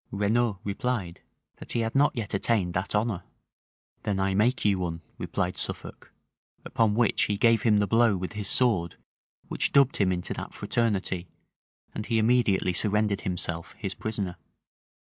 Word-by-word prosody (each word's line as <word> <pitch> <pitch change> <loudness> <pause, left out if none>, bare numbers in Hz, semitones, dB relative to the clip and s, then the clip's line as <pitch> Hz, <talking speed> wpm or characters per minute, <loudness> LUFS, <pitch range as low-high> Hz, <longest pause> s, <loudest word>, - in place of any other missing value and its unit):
Renaud 105 +2 +1
replied, 100 -3 -3 0.4
that - - -6
he 120 - +1
had 115 0 -2
not 140 +1 +3
yet 110 -4 -4
attained 100 -3 +1
that 95 +3 -2
honor. 105 -4 0 0.8
"Then 100 -2 -1
I 95 0 +1
make 110 +6 +1
you 100 -2 +3
one," 85 -2 -3 0.2
replied 90 +1 -2
Suffolk; - - -5 0.5
upon 110 -2 +1
which 120 -1 +3
he 105 - -1
gave 115 0 +4
him 105 -2 +4
the 105 - +3
blow 115 -1 +3
with 90 +3 -5
his 105 -1 -2
sword 100 -11 +2 0.5
which - - -1
dubbed 140 -1 +4
him 95 -2 +2
into 90 -1 -2
that - - -7
fraternity; 95 -6 -1 0.7
and 105 - -5
he 115 - +1
immediately 110 -5 +2
surrendered 105 +1 +1
himself 85 -3 -3
his 95 -3 -3
prisoner. 100 -5 -4
105 Hz, 160 wpm, -27 LUFS, 95-115 Hz, 0.8 s, gave